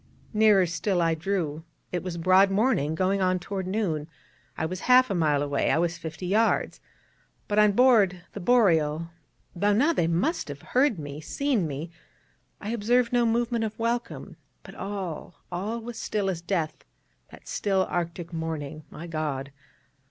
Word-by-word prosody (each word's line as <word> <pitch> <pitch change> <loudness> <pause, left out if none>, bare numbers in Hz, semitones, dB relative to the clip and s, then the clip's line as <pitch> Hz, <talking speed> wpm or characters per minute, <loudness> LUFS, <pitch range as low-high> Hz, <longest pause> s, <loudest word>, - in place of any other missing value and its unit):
Nearer 210 -3 +5
still 180 +2 -1
I 165 -1 +2
drew: 160 -2 -2 0.3
it 180 - -2
was 180 -2 -5
broad 185 +3 +5
morning, 195 - +1
going 190 +3 +1
on 185 0 +2
toward 190 +1 -5
noon: 180 -7 -1 0.5
I - - -1
was 180 +3 -4
half 255 -1 +6
a - - +1
mile 150 -5 +2
away, 140 -1 0
I - - +3
was 170 0 0
fifty 160 +1 -6
yards. 215 +5 +1 0.7
But 210 0 +1
on 210 -1 +5
board 205 -7 +4
the - - -6
Boreal, 170 -8 +2 0.4
though 205 +4 +2
now 285 +11 +3
they 165 - +1
must 180 - 0
have - - -8
heard 255 -4 +2
me, 145 -1 -7
seen 240 - 0
me, 150 +4 -5 0.7
I 210 - -6
observed 235 +2 +1
no 240 -1 +3
movement 235 0 0
of 220 -1 -4
welcome, 235 +1 -3 0.3
but - - -11
all, 190 -4 -5 0.2
all 205 +7 -3
was 235 0 -7
still 200 -2 -1
as 170 -2 -5
death 170 -3 -2 0.5
that - - -15
still 195 -2 0
Arctic 170 0 -4
morning, 155 -2 -4
my 165 - -9
God. 150 -4 -3
185 Hz, 165 wpm, -26 LUFS, 165-215 Hz, 0.7 s, half